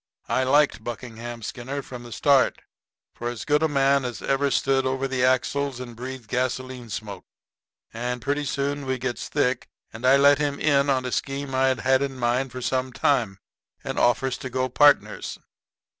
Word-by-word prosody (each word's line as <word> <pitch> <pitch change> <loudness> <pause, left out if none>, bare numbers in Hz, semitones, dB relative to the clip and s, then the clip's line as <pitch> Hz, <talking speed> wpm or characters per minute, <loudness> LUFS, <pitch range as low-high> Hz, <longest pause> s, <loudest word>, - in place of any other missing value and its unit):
I - - +1
liked 145 -3 +3
Buckingham 120 0 -7
Skinner 130 +5 -5
from 125 -2 -9
the 120 -1 -11
start, 140 +2 +3 0.5
for 120 - -4
as 120 -4 -6
good 150 0 +2
a 160 - +3
man 140 -1 +2
as 125 -2 -4
ever 140 +1 +1
stood 135 +1 +2
over 130 +1 -1
the 130 -1 -1
axles 130 +1 +1
and 120 -2 -8
breathed 130 -1 -7
gasoline 125 +1 -3
smoke. 105 -2 -6 0.7
And 120 +2 -3
pretty 145 +4 -1
soon 140 0 -2
we 130 0 0
gets 125 -1 -4
thick, 125 -4 0 0.3
and 115 +2 -9
I 130 +2 +6
let 140 +1 +5
him 145 -1 -1
in 140 -2 +3
on 130 -2 +1
a 125 - -3
scheme 135 +1 -3
I'd 130 0 +2
had 130 +1 +3
in 135 -1 -2
mind 125 +2 0
for 130 +1 -6
some 130 0 -1
time, 120 -7 +1 0.5
and - - -3
offers 125 +1 +2
to 130 - -5
go 130 +1 -1
partners. 145 +3 +3
130 Hz, 180 wpm, -25 LUFS, 120-140 Hz, 0.7 s, I